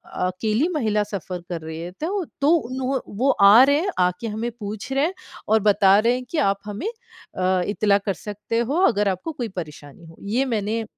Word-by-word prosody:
अकेली 215 - 0
महिला 215 -6 +1
सफ़र 185 -3 -6
कर 170 -2 -4
रही 160 0 -7
है 175 +1 -6
तो 375 +3 -1 0.2
तो 285 - +3 0.2
उन्हों 260 +1 -1 0.2
वो 265 +3 +2
आ 200 +5 +7
रहे 285 +2 +4
हैं, 390 +4 -1
आके 180 +5 0
हमें 225 +3 -3
पूछ 210 +5 -6
रहे 275 +3 +2
हैं 365 - -2 0.3
और 220 +1 +4
बता 200 -1 +5
रहे 235 +3 +3
हैं 255 0 -3
कि 330 - -4
आप 200 -8 +2
हमें 210 - -5 0.5
अ, 185 0 +2
इत्तला 205 -1 +2
कर 200 -1 -2
सकते 210 +3 -5
हो 250 +6 -1
अगर 210 -3 +1
आपको 190 - -3
कोई 245 -6 -4
परेशानी 150 -1 -8
हो। 165 0 -14
ये 225 +7 0
मैंने 225 -1 -1
210 Hz, 200 wpm, -23 LUFS, 195-255 Hz, 0.5 s, आ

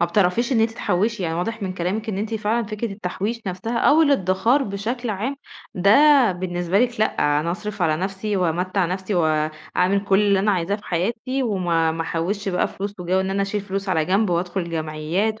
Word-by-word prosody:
ما 170 - +3
بتعرفيش 205 +7 +1
إن 225 - +3
أنتِ 225 0 +2
تحوشي، 210 0 -1
يعني 165 -2 -1
واضح 220 +5 -3
من 185 - -2
كلامِك 195 +6 -2
إن 195 -2 -2
أنتِ 220 +2 -3
فعلًا 220 +2 0
فكرة 215 0 -4
التحويش 205 +4 -4
نفسها 210 +6 -3
أو 315 +2 +5
الادخار 235 - +2
بشكل 225 +3 -3
عام، 225 +8 -3 0.4
ده 195 +2 +3 0.4
بالنسبة 175 +1 -1
لِك 245 -2 0
لأ، 145 -8 +2
أنا 170 - -2
أصرف 210 +2 -4
على 155 -2 +2
نفسي 195 +3 -2
وأمتع 180 +2 0
نفسي 190 +3 -3
وأعمل 160 +4 0
كل 195 0 +3
اللي 200 -2 +3
أنا 205 +2 +2
عايزاه 185 +2 0
في 210 - -17
حياتي 235 +9 -2
وما 175 -7 +1
ما 165 0 -2
أحوش 190 +5 -2
بقى 180 -1 +1
فلوس، 200 +1 -5
وجَوّ 185 +2 +1
إن 190 0 -2
أنا 200 +1 0
أشيل 200 +1 -2
فلوس 195 0 -4
على 160 -4 +2
جنب 195 +3 +1
وأدخل 175 0 -2
جمعيات 165 +7 -2
195 Hz, 195 wpm, -22 LUFS, 175-215 Hz, 0.4 s, أو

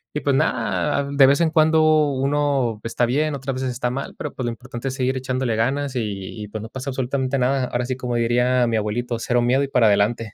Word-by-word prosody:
Y 150 - -1
pues 140 -2 +1
nada, 115 - 0
de 140 -1 +6
vez 140 +4 +3
en 165 -2 +2
cuando 155 -1 +4
uno 135 -4 0
está 115 +1 0
bien, 145 +4 0
otras 135 0 -4
veces 130 0 -2
está 125 0 -2
mal, 135 +2 -5
pero - - -5
pues, 130 - -4
lo 120 - 0
importante 120 +1 -7
es 130 - -3
seguir 130 0 0
echándole 130 -2 -1
ganas 135 +4 -1
y 105 -3 -4
y 105 - -6
pues, 105 +1 -6
no 110 - -8
pasa 130 +3 -6
absolutamente 130 +1 -1
nada. 130 +1 +1
Ahora 120 0 -2
sí, 130 - -2
como 125 -2 -4
diría 120 +2 +2
mi 115 -1 0
abuelito, 115 +3 -2
cero 120 +1 +1
miedo 130 +3 +2
y - - -2
para 125 -4 +3
adelante. 105 +2 +1
130 Hz, 230 wpm, -22 LUFS, 120-140 Hz, -, de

